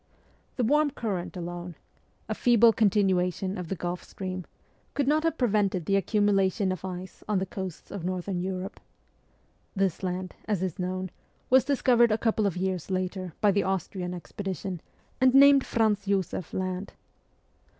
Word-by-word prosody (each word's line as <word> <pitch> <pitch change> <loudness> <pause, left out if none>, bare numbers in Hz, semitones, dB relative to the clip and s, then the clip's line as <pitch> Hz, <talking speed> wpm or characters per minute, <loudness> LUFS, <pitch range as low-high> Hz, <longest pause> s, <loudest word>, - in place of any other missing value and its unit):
The 250 - 0
warm 295 +5 +3
current 195 -9 -4
alone 175 0 -6 0.5
a 220 - -1
feeble 235 0 +5
continuation 190 -3 +2
of 180 -4 -5
the 195 - -2
Gulf 175 +1 -4
Stream 185 -2 -6 0.5
could 280 -2 0
not 305 +2 +3
have 330 -1 0
prevented 205 - +1
the 195 - +2
accumulation 195 -1 +2
of 185 - -5
ice 185 0 -7
on 210 - +2
the 190 - 0
coasts 190 -2 -7
of 195 -4 -5
Northern 180 0 -2
Europe. 185 +1 -4 1.0
This 195 -3 0
land, 185 0 -3
as 205 -4 -1
is 185 -2 -3
known, 185 0 -3 0.4
was 260 0 +6
discovered 245 -4 +4
a 215 - +3
couple 220 -2 +1
of 185 - -3
years 185 -2 -2
later 185 -1 -2
by 210 -2 +5
the 200 +1 +2
Austrian 185 -1 -2
expedition, 185 -1 -5 0.4
and 260 0 +5
named 280 0 +8
Franz 210 -3 +1
Josef 190 -3 -1
Land. 185 +1 -3
190 Hz, 155 wpm, -27 LUFS, 185-215 Hz, 1.0 s, named